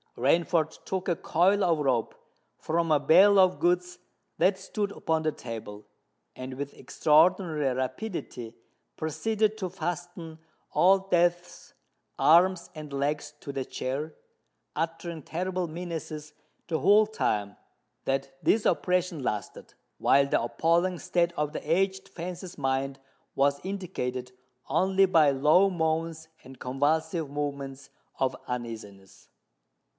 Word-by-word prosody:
Rainford 160 +4 +1
took 190 -1 -3
a 175 - +2
coil 190 +6 +2
of 165 -3 +2
rope 130 -6 0 0.4
from 165 0 -1
a 150 - +5
bale 185 +8 +6
of 185 -1 +4
goods 180 0 0 0.4
that 190 0 +3
stood 200 +1 -3
upon 160 -4 -1
the 155 - +1
table, 110 -5 -8 0.5
and 130 0 -7
with 140 +1 -5
extraordinary 155 +1 +2
rapidity 130 - -5 0.4
proceeded 210 +8 0
to 185 -3 -2
fasten 175 -2 -5 0.3
Old 195 +1 +3
Death's 175 0 0 0.5
arms 175 +3 +4
and 155 -2 -8
legs 145 +2 -2
to 140 - -6
the 135 - -2
chair, 140 +5 -4 0.6
uttering 165 +1 -3
terrible 180 +3 -3
menaces 160 -2 -6 0.3
the 160 -2 -1
whole 205 +8 +6
time 105 - -1 0.5
that 135 0 -2
this 220 - +3
operation 180 -4 +1
lasted; 105 -5 -4 0.2
while 140 0 +4
the - - +1
appalling 170 +9 +1
state 170 -1 +1
of 150 0 -1
the 150 - -4
aged 190 +2 +1
fence's 175 +1 -7
mind 135 0 -1 0.3
was 140 +1 +2
indicated 145 -10 -4 0.4
only 190 +1 +3
by 165 -6 +5
low 150 +8 +4
moans 160 -2 -2 0.2
and 130 0 -13
convulsive 150 +4 0
movements 140 -1 -5 0.3
of 130 -1 +1
uneasiness. 105 -6 -7
160 Hz, 120 wpm, -28 LUFS, 135-180 Hz, 0.6 s, bale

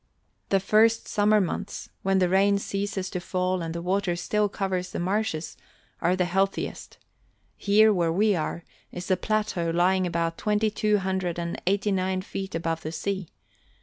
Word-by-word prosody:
The 195 - +3
first 220 +4 +3
summer 210 +1 +3
months, 200 +1 -3
when 195 0 +2
the 185 -1 +3
rain 195 +2 +3
ceases 200 -1 -3
to 180 - -2
fall 185 0 -1
and 165 0 -4
the 170 - -4
water 185 -1 0
still 210 +4 0
covers 185 -2 -2
the - - -4
marshes, 185 -3 -1 0.5
are 180 - +2
the 185 -1 +1
healthiest. 195 +2 -2 0.6
Here, 215 +1 +4
where 170 -3 +1
we 205 +4 +3
are, 170 +1 -3 0.3
is 180 +1 -5
a - - +5
plateau 210 -4 -1
lying 180 +2 +2
about 165 -1 -1
twenty 210 0 +1
two 210 0 +2
hundred 190 -3 -2
and 170 0 -4
eighty 200 +2 +2
nine 185 -1 0
feet 195 -2 -5
above 165 0 -2
the 155 - -5
sea. 190 +2 -3
190 Hz, 170 wpm, -26 LUFS, 175-200 Hz, 0.6 s, a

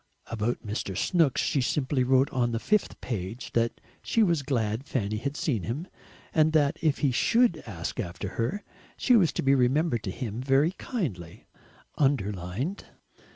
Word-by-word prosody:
About 115 +2 -2
Mr. 105 -3 -3
Snooks 165 -7 +2
she 140 - +1
simply 130 0 0
wrote 130 +2 +3
on 120 -2 0
the 115 - 0
fifth 210 - 0
page 110 +1 -5
that 115 0 0 0.2
she 225 - +2
was 170 -6 +2
glad 115 -4 -1
Fanny 110 -7 -2
had 140 +6 -3
seen 145 - 0
him, 130 - -4 0.5
and 155 0 +3
that 145 -2 +3
if 155 -4 +2
he 135 - +3
SHOULD 230 - +3
ask 85 +1 -5
after 95 -2 -4
her, 120 - -2 0.3
she 250 - +4
was 175 -10 +4
to - - -2
be 135 0 +4
remembered 130 0 +2
to 105 - -4
him 115 +3 -4
VERY 135 +5 +3
KINDLY 125 - -5 0.5
(underlined). 120 - -1
130 Hz, 160 wpm, -27 LUFS, 110-155 Hz, 0.5 s, she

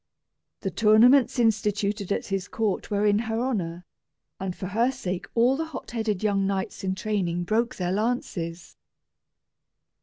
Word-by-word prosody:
The - - -2
tournaments 235 +6 +5
instituted 210 -3 +1
at - - 0
his 195 -1 -2
court 220 -6 -2
were 205 0 +1
in 205 0 +4
her 225 0 -2
honor, 180 -9 -2 0.5
and 190 -2 -3
for - - -6
her 230 +5 +2
sake 185 -8 -4
all 240 +3 +4
the 320 +3 -2
hotheaded 220 -4 -3
young 200 -2 +2
knights 195 -1 -3
in 190 0 -1
training 190 -4 -1
broke 230 +7 0
their 180 -1 -2
lances. 185 -6 -3
210 Hz, 145 wpm, -26 LUFS, 190-230 Hz, 0.5 s, tournaments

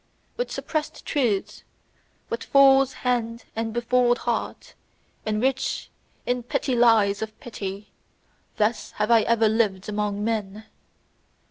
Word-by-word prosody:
With - - -3
suppressed 310 -2 -4
truths, 235 -9 -1 0.7
with 230 - -4
fool's 270 -1 +5
hand 235 -2 -1
and 225 0 -2
befooled 240 +1 +2
heart, - - -3 0.5
and 215 0 0
rich 265 +2 -1 0.3
in 245 0 0
petty 265 +2 -2
lies 220 -4 +4
of 220 0 -6
pity: 200 -3 -7 0.7
thus 215 +1 0
have 215 +2 -1
I 230 -1 +6
ever 225 0 +3
lived 210 -4 0
among 210 -1 -2
men. 215 -1 -3
230 Hz, 120 wpm, -24 LUFS, 210-245 Hz, 0.7 s, I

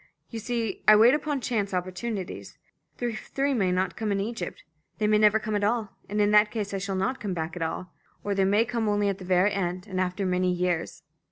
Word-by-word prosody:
"You 230 - -4
see, 230 -3 -3
I 215 - +9
wait 230 +4 +7
upon 295 -2 -1
chance 205 -6 -1
opportunities; 185 - -4 0.4
the 240 -1 -2
three 275 +5 -2
may 195 -7 +1
not 185 0 0
come 215 -1 -2
in 200 - +1
Egypt. 205 -3 -4 0.3
They 215 - 0
may 210 0 +4
never 210 0 +5
come 215 -1 -3
at 205 - 0
all, 215 -1 0 0.2
and 210 +1 -2
in 205 0 +3
that 210 0 +6
case 210 -3 -4
I 195 - -1
shall 195 0 -3
not 195 +8 -1
come 195 -4 -3
back 160 +1 -4
at 175 - -6
all. 165 +2 -4 0.3
Or 205 - -1
they 195 -1 +2
may 205 +4 +3
come 230 -3 -1
only 205 -1 +2
at 195 0 -3
the 185 - -8
very 185 +2 +3
end 180 -1 -2
and 190 -3 -2
after 185 +2 -1
many 185 0 +1
years. 180 -2 -2
205 Hz, 235 wpm, -27 LUFS, 185-220 Hz, 0.4 s, I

